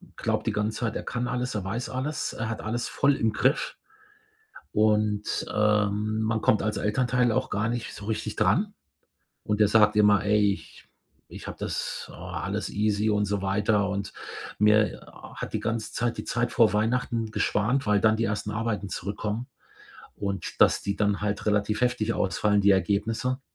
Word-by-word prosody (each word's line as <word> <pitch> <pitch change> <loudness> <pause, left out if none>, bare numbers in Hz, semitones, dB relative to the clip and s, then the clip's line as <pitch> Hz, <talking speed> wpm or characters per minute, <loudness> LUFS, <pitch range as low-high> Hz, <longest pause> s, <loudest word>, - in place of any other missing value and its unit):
glaubt - - -2
die - - +1
ganze 105 +1 -1
Zeit, 115 -3 -2
er - - -3
kann 120 0 -3
alles, 125 0 -2
er 100 -3 -3
weiß 115 +6 -3
alles, 130 +4 -2
er 115 - -4
hat 110 - -4
alles 120 +3 -2
voll 140 -1 +2
im 110 -1 0
Griff. 130 +7 +1 1.0
Und, 105 -1 +1
ähm, 105 0 +1
man 110 0 0
kommt 105 - +3
als 105 0 -1
Elternteil 125 +2 +1
auch 130 +3 0
gar 110 +2 -1
nicht 120 -1 -4
so 105 - -9
richtig 110 0 -3
dran. 180 - +2 0.7
Und 105 0 0
der 105 - +5
sagt 105 -1 +5
immer: 105 -2 +5
„Ey, 105 -1 +4
ich - - -9 0.4
ich - - -9
hab - - -6
das - - -4
oh, - - -13
alles - - -4
easy“ 105 +1 +1
und 105 -1 +2
so 100 -1 -1
weiter. 100 +1 +1
Und 100 0 -3 0.5
mir 105 0 +3 0.3
hat - - -6
die - - -1
ganze 115 0 -3
Zeit 120 0 -1
die - - -5
Zeit 120 0 -1
vor 110 -3 +4
Weihnachten 115 +1 0
geschwant, 120 +7 +1
weil 105 -1 +3
dann 110 0 +4
die 115 - +1
ersten 105 0 -2
Arbeiten 110 -2 -2
zurückkommen 105 +6 -4 0.7
und 100 -1 -4
dass - - +5
die 100 0 -2
dann 100 0 0
halt 105 0 -2
relativ 105 +1 +1
heftig 120 -3 +1
ausfallen, 105 +1 +1
die 100 0 +4
Ergebnisse. 110 +7 0
105 Hz, 180 wpm, -26 LUFS, 105-115 Hz, 1.0 s, der